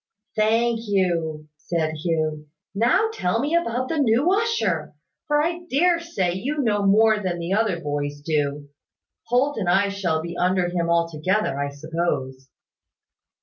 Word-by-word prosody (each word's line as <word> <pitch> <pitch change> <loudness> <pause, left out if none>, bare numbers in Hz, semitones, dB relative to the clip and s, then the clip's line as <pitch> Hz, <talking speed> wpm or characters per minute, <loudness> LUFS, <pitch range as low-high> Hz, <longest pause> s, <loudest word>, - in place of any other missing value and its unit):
"Thank 225 +2 +2
you," 165 -6 0
said 160 +1 -2
Hugh. 155 -1 -2 0.3
"Now 240 - +2
tell 180 - 0
me 295 +6 0
about 255 -6 0
the 320 +1 -1
new 275 +7 +3
usher; 225 - 0 0.3
for 295 0 +2
I 340 +2 -1
dare 340 +5 +3
say 200 - -1
you 260 +11 -3
know 215 -7 +1
more 215 +2 +5
than 185 -4 -2
the 170 +2 -3
other 205 -5 +1
boys 145 -1 -3
do. 145 -2 -1 0.6
Holt 260 +5 +1
and 185 -4 -1
I 200 +3 +3
shall 185 -5 -1
be 170 +2 -6
under 180 0 +1
him 170 -1 -1
altogether, 170 +3 +1
I 140 0 -1
suppose." 140 -3 -3
185 Hz, 150 wpm, -23 LUFS, 160-235 Hz, 0.6 s, more